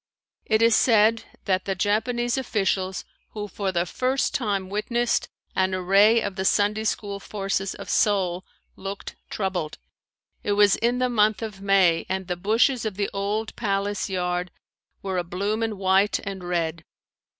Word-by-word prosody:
It 220 Hz, 0 st, +3 dB
is 230 Hz, -1 st, +5 dB
said 225 Hz, -1 st, +4 dB, 0.2 s
that 190 Hz, -2 st, 0 dB
the 195 Hz, -, -1 dB
Japanese 235 Hz, +5 st, 0 dB
officials 195 Hz, -7 st, -1 dB, 0.3 s
who 210 Hz, -1 st, -4 dB
for 195 Hz, 0 st, -3 dB
the 175 Hz, -1 st, 0 dB
first 255 Hz, +8 st, 0 dB
time 200 Hz, -6 st, -1 dB
witnessed 235 Hz, +4 st, 0 dB, 0.3 s
an 190 Hz, 0 st, +1 dB
array 200 Hz, +5 st, +4 dB
of 190 Hz, -, -4 dB
the 190 Hz, -, -1 dB
Sunday 210 Hz, +2 st, +2 dB
school 200 Hz, -2 st, -2 dB
forces 195 Hz, -1 st, -3 dB
of -, -, -9 dB
Seoul 190 Hz, -3 st, +1 dB, 0.3 s
looked 195 Hz, +1 st, -7 dB
troubled. 185 Hz, -6 st, -3 dB, 0.6 s
It 205 Hz, -, 0 dB
was 205 Hz, -1 st, +5 dB
in 240 Hz, +2 st, +1 dB
the 255 Hz, 0 st, +1 dB
month 215 Hz, -3 st, +2 dB
of 210 Hz, -3 st, -6 dB
May 190 Hz, -4 st, +3 dB
and 190 Hz, 0 st, -2 dB
the 180 Hz, 0 st, -2 dB
bushes 225 Hz, +7 st, +2 dB
of 215 Hz, -3 st, -3 dB
the 200 Hz, -1 st, -1 dB
old 205 Hz, +3 st, -2 dB
palace 200 Hz, -2 st, -1 dB
yard 180 Hz, -1 st, -1 dB, 0.5 s
were 190 Hz, -2 st, -1 dB
abloom 195 Hz, +5 st, -2 dB
in 220 Hz, -2 st, -2 dB
white 190 Hz, +1 st, +3 dB
and 195 Hz, -2 st, -6 dB
red. 170 Hz, -2 st, -2 dB
200 Hz, 155 wpm, -24 LUFS, 190-220 Hz, 0.6 s, is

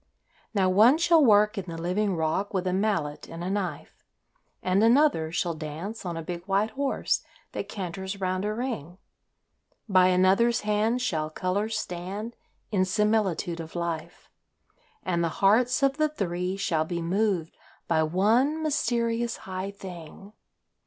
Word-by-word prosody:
Now, 190 Hz, -2 st, +3 dB
one 215 Hz, +10 st, +6 dB
shall 330 Hz, -1 st, +5 dB
work 210 Hz, -2 st, +4 dB
in 190 Hz, -, -6 dB
the 165 Hz, -2 st, -7 dB
living 185 Hz, +4 st, 0 dB
rock 165 Hz, +6 st, -1 dB
with 185 Hz, -1 st, 0 dB
a 180 Hz, -, 0 dB
mallet 185 Hz, -7 st, -1 dB
and 165 Hz, +1 st, -7 dB
a 185 Hz, -, -2 dB
knife, 185 Hz, -7 st, -4 dB, 0.6 s
And 185 Hz, +3 st, +2 dB
another 235 Hz, -, +4 dB
shall 175 Hz, 0 st, -1 dB
dance 165 Hz, +7 st, -6 dB
on 170 Hz, -1 st, -3 dB
a 165 Hz, -, -4 dB
big 175 Hz, +1 st, -6 dB
white 200 Hz, +3 st, +1 dB
horse 275 Hz, 0 st, 0 dB, 0.3 s
that -, -, -5 dB
canters 190 Hz, +1 st, -5 dB
round 185 Hz, 0 st, -1 dB
a 210 Hz, -, -1 dB
ring, 215 Hz, -, -4 dB, 0.9 s
By 185 Hz, -3 st, +5 dB
another's 190 Hz, +6 st, +3 dB
hand 215 Hz, +4 st, +1 dB
shall 155 Hz, -9 st, -1 dB
colours 200 Hz, +7 st, -1 dB
stand 195 Hz, +6 st, -5 dB, 0.4 s
in 195 Hz, -3 st, +2 dB
similitude 190 Hz, -3 st, 0 dB
of 165 Hz, 0 st, -8 dB
life; 170 Hz, 0 st, -4 dB, 0.8 s
And 170 Hz, -2 st, 0 dB
the 165 Hz, -, +1 dB
hearts 235 Hz, -, +3 dB
of 275 Hz, +1 st, +2 dB
the 310 Hz, 0 st, +2 dB
three 185 Hz, -, -2 dB
shall 165 Hz, -5 st, 0 dB
be 170 Hz, +2 st, -4 dB
moved 185 Hz, -2 st, 0 dB, 0.3 s
by 160 Hz, -2 st, +2 dB
one 225 Hz, -, +2 dB
mysterious 235 Hz, -5 st, 0 dB
high 185 Hz, +1 st, -4 dB
thing. 195 Hz, 0 st, -10 dB
190 Hz, 150 wpm, -27 LUFS, 175-220 Hz, 0.9 s, one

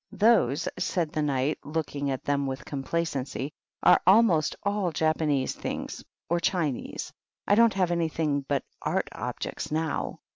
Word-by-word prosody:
"Those," 180 Hz, -, +3 dB
said 165 Hz, -4 st, 0 dB
the 155 Hz, -, -3 dB
Kjiight, 140 Hz, 0 st, 0 dB
looking 145 Hz, -2 st, -2 dB
at 135 Hz, -1 st, -3 dB
them 140 Hz, -1 st, 0 dB
with 135 Hz, 0 st, -5 dB
complacency, 140 Hz, -1 st, -2 dB, 0.3 s
"are -, -, +6 dB
almost 190 Hz, -6 st, +5 dB
all 200 Hz, -3 st, 0 dB
Japanese 155 Hz, -4 st, +1 dB
things, -, -, -5 dB, 0.2 s
or 170 Hz, +1 st, +1 dB
Chinese. 165 Hz, -6 st, -2 dB, 0.3 s
I -, -, +4 dB
don't 230 Hz, 0 st, +5 dB
have 185 Hz, -3 st, +2 dB
anything 160 Hz, -4 st, 0 dB
but 140 Hz, -1 st, 0 dB, 0.2 s
art -, -, -1 dB
objects -, -, -5 dB
now." 155 Hz, -1 st, -2 dB
155 Hz, 140 wpm, -27 LUFS, 140-175 Hz, 0.3 s, are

